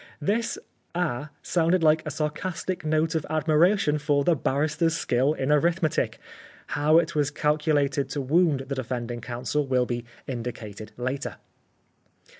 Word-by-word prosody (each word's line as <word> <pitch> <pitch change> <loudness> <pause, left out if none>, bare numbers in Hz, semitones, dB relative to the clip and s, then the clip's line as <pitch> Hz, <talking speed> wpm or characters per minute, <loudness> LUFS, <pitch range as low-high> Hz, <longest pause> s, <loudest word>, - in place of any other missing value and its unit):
'" - - -39
This 230 +1 -2 0.2
" - - -29
Ah! 155 -5 -1
" - - -39
sounded 170 0 +2
like 155 0 +5
a - - -4
sarcastic 160 +5 -3
note 155 +1 +1
of 160 -2 0
admiration 155 +2 +3
for 145 -1 +2
the 170 +3 +3
barrister's 155 +4 0
skill 135 0 +2
in 135 -1 -1
arithmetic. 165 +2 +1 0.5
How 150 +2 +3
it 170 0 +2
was 145 -3 +1
calculated 150 -2 +1
to 145 - -2
wound 150 +1 +3
the 135 +1 -5
defending 120 -2 -4
counsel 130 +5 -2
will 130 -1 +2
be 120 -1 -3 0.2
indicated 115 -4 -6
later. 130 +3 -3
150 Hz, 150 wpm, -26 LUFS, 130-160 Hz, 0.5 s, like